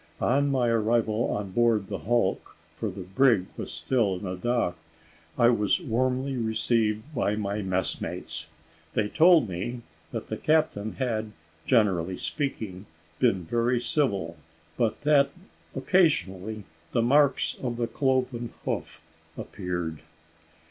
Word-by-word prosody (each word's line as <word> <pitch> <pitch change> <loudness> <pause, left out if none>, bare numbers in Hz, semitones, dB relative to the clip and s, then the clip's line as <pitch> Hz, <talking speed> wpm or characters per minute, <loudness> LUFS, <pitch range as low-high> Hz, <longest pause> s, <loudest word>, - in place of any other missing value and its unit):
On, 140 +3 +2
my 130 -3 +2
arrival 115 0 +2
on 100 -2 -3
board 115 -1 +2
the - - -4
hulk, 115 -3 0 0.2
for 110 - -3
the 95 0 -7
brig 100 +1 +3
was - - -6
still 115 -7 +1
in 90 -1 -5
dock, 120 -5 0 0.6
I 120 -1 +6
was 105 - +2
warmly 130 -1 -1
received 110 +2 0
by 110 -5 0
my 105 0 -2
messmates. 95 -3 -3 0.5
They 105 - +2
told 165 - +5
me 100 +7 -4 0.3
that - - -4
the - - -4
captain 150 -9 +1
had, 110 -5 -2 0.3
generally 95 -7 +2
speaking, 110 -10 -4 0.3
been 95 -2 +2
very 120 +7 +1
civil, 100 - 0 0.4
but 115 -3 0
that, 145 -2 +4 0.5
occasionally, 110 - +1 0.3
the 115 - +2
marks 140 +2 +3
of 120 -2 -3
the 120 - 0
cloven 130 -2 0 0.2
foot - - -4 0.4
appeared. 85 -3 -4
115 Hz, 125 wpm, -27 LUFS, 100-130 Hz, 0.6 s, I